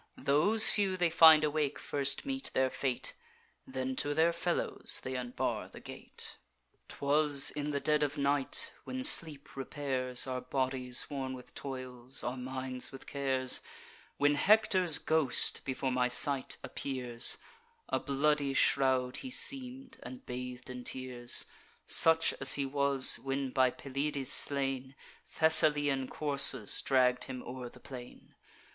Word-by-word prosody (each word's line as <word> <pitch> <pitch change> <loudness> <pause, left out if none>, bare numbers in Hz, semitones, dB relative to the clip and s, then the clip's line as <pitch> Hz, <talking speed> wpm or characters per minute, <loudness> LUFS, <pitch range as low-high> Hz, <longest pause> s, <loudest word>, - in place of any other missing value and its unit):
Those 200 +11 +6
few 195 -3 0
they 175 -2 +1
find 160 -2 +7
awake 150 -1 -1
first 140 -1 -1
meet 270 -1 -4
their 130 0 +1
fate; 130 -3 -3 0.5
Then 130 0 -4
to 145 0 0
their 165 +2 +2
fellows 170 0 0
they 130 +1 -5
unbar 125 -1 -3
the - - -13
gate. - - -9 0.5
"'Twas 145 0 +1
in 150 0 -4
the 140 -1 -2
dead 150 +1 +1
of 150 0 -2
night, 140 -1 -2
when 260 0 -6
sleep 155 - +3
repairs 130 -2 -2
Our 130 -1 -4
bodies 130 -1 -1
worn 135 -2 -4
with 125 - -12
toils, 130 -1 -8
our 120 +1 -3
minds 130 0 -5
with 135 - -12
cares, 130 -2 0 0.6
When 145 +1 +2
Hector's 185 -1 +3
ghost 155 -5 0
before 130 0 -3
my 125 0 +1
sight 135 +1 0
appears: 125 -3 0 0.5
A - - 0
bloody 140 0 0
shroud 130 -2 +1
he 260 - -7
seem'd, 260 0 -4
and 260 0 -10
bath'd 125 0 -7
in 125 -1 -8
tears; 125 -1 -2 0.4
Such 165 0 +4
as 135 - +6
he 140 - -1
was, 140 -1 +1
when, 135 0 -3
by 130 0 +3
Pelides 140 +1 -4
slain, 135 -1 0 0.3
Thessalian 145 -4 +4
coursers 140 -7 +2
dragg'd 125 -2 +1
him 125 -1 -8
o'er 125 0 -8
the - - -17
plain. 125 -2 -12
135 Hz, 140 wpm, -31 LUFS, 130-150 Hz, 0.6 s, find